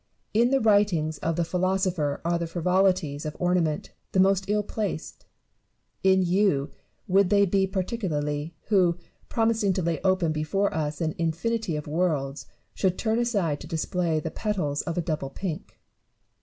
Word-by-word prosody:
In 235 +3 +4
the 270 +1 +3
writings 200 - +2
of 165 0 -1
the 170 - +1
philosopher 180 -4 0
are 170 0 +1
the 170 - -2
frivolities 180 -3 +1
of 150 -1 -5
ornament 175 -4 0 0.2
the 190 - +2
most 195 0 +4
ill 210 0 +2
placed; 205 -6 -5 0.8
in 190 0 +4
you 180 -6 +2 0.4
would 195 0 +4
they 200 0 +5
be 195 +1 +2
particularly, 165 -6 -2
who, 180 -5 +3 0.3
promising 225 -4 +2
to 185 -1 -1
lay 165 -1 -1
open 185 -4 +2
before 155 +6 0
us 155 0 -2
an 160 -1 0
infinity 170 +3 -1
of 150 - -4
worlds, 150 -4 -1 0.3
should 185 -2 0
turn 225 0 0
aside 200 -11 0
to 160 - -9
display 165 0 -1
the - - -4
petals 180 -10 -1
of 170 - -4
a - - +2
double 155 -4 -2
pink. 165 +3 -6
180 Hz, 155 wpm, -26 LUFS, 155-195 Hz, 0.8 s, they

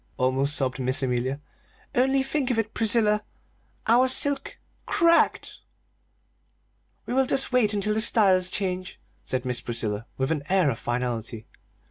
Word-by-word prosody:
almost 135 +3 0
sobbed 130 0 -1
Miss 130 +1 0
Amelia. 130 +2 -1 0.5
"Only 265 +2 +2
think 270 -1 -2
of 245 - 0
it, 225 -1 -2
Priscilla, 215 -2 +2 0.6
our 245 +3 +4
silk 280 +2 +1 0.3
cracked!" 335 0 +2 1.5
"We - - -4
will 265 0 +2
just 270 0 0
wait 245 -5 +3
until 210 0 -1
the 220 - +1
styles 190 -5 +4
change," 185 -1 -4 0.2
said 130 0 -3
Miss 125 -1 -2
Priscilla, 110 -2 -2
with 130 +3 -1
an 155 -3 -1
air 185 -6 +3
of 115 - -6
finality. 120 -2 -4
185 Hz, 140 wpm, -25 LUFS, -, 1.5 s, our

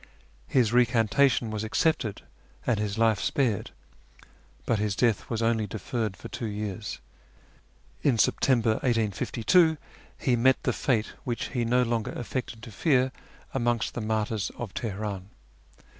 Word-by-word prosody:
His 120 -4 +2
recantation 120 0 +3
was 110 0 -3
accepted 110 -2 0 0.4
and 115 -4 +1
his 105 -1 -2
life 110 -3 +3
spared, 120 -8 0 1.0
but 115 - +1
his 105 -2 0
death 115 -2 +1
was 115 -1 -1
only 115 -2 +1
deferred 110 0 -3
for - - -8
two 115 - -5
years. 105 0 -4 1.0
In 130 -5 +3
September 120 +1 +3
1852 120 - +2 0.4
he 125 - +1
met 130 +3 +4
the 125 - +1
fate 115 -4 0
which 120 -2 -3
he 120 -3 -1
no 125 +2 +3
longer 115 -2 -1
affected 120 -2 -5
to 115 - -9
fear 130 - +2 0.4
amongst 120 -3 0
the 120 - -4
martyrs 110 -1 -1
of 115 -5 -6
Teheran. 100 -3 -4
115 Hz, 135 wpm, -27 LUFS, 105-125 Hz, 1.0 s, met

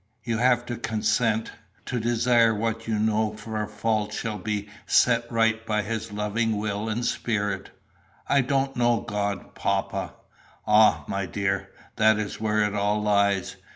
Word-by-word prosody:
You 115 -2 -1
have 125 0 +3
to 120 -1 -4
consent, 110 0 0 0.3
to 125 - -2
desire 120 0 +3
that 105 - -4
what 115 0 -2
you 110 -1 0
know 110 0 +1
for 110 0 -4
a 105 - -3
fault 105 0 -1
shall 110 -3 -3
be 105 +1 -3 0.2
set 120 -1 +3
right 115 -1 +2
by 105 -2 0
his 110 +1 -4
loving 105 +2 -1
will 105 +1 -2
and 120 +2 -2
spirit." 100 -4 -1 0.6
"I 140 - +4
don't 135 +1 0
know 120 -2 +2
God, 100 -2 -3
papa." - - -2 0.5
"Ah, 105 -8 +5
my 100 -1 -2
dear, 95 0 -2 0.3
that 110 0 +5
is 110 0 -4
where 110 -1 +2
it 105 -1 -1
all 105 +1 +1
lies. 100 -2 +1
110 Hz, 160 wpm, -25 LUFS, 105-115 Hz, 0.6 s, Ah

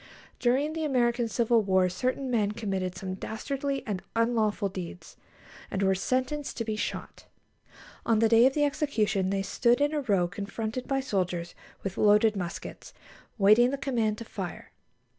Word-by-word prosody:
During 270 +5 +1
the 320 0 -3
American 240 -4 +1
Civil 230 0 +2
War 190 -2 +3
certain 255 +8 -2
men 210 -3 +1
committed 195 -5 -3
some 185 0 -5
dastardly 275 +8 -3
and 200 -5 -3
unlawful 225 -3 +1
deeds, 185 -2 -8 0.5
and 195 - -2
were 190 0 +4
sentenced 260 +8 -2
to 230 - -2
be 215 -1 -2
shot. - - -5 0.8
On 225 - +2
the 225 +1 +4
day 230 +2 +6
of 265 - -1
the 295 - +2
execution 225 -10 0
they 195 0 0
stood 235 +5 +2
in 290 +1 +2
a 300 - 0
row 200 -9 +2
confronted 215 +5 -5
by 270 -1 0
soldiers 180 -7 -2 0.3
with 195 -1 -4
loaded 210 +1 +5
muskets, 175 -3 -6 0.4
waiting 215 +4 +6
the 280 - -2
command 235 -6 0
to 230 - -8
fire. - - -7
220 Hz, 160 wpm, -28 LUFS, 195-255 Hz, 0.8 s, day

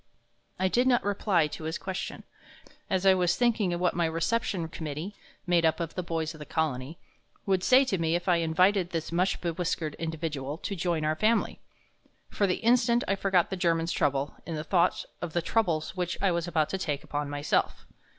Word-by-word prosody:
'" 120 0 -44 0.2
I 190 - +2
did 245 +7 +2
not 245 -2 +3
reply 200 -4 +2
to 155 +1 -7
his 160 +1 -2
question, 190 -1 -5 0.7
as 190 0 0
I 190 - +7
was 180 -1 +2
thinking 220 -7 +1
what 180 0 +1
my 170 -1 +1
Reception 165 +1 -1
Committee 160 +4 -5 0.3
made 175 -2 +3
up 160 +1 +2
of 165 -2 -3
the 185 - -2
boys 165 -2 -3
of 155 - -13
the 150 - -7
Colony 155 -1 -2 0.5
would 190 -2 +1
say 260 +5 +6
to 195 -8 -1
me 165 0 +1
if 175 - -3
I 175 -2 +4
invited 175 +3 +2
this 165 -2 -4
much 180 +3 +1
bewhiskered 165 -2 -2
individual 155 -3 -3
to 200 +2 -4
join 170 -3 -1
our 155 0 +1
Family. 220 +8 +1 0.7
For 200 - +1
the 180 - -1
instant 235 0 +4
I 195 - +2
forgot 195 -3 +1
the - - -1
German's 165 -2 +1
troubles 140 0 0
in 165 - -5
the 150 - -3
thought 175 +1 +1 0.2
of 175 -3 -4
the 175 - +1
troubles 175 -7 0
which 180 -1 -2
I 195 -2 +2
was 170 0 -1
about 155 -3 +1
to 190 - -3
take 145 -6 -2
upon 145 0 -3
myself. 145 +1 -1
170 Hz, 200 wpm, -28 LUFS, 160-190 Hz, 0.7 s, I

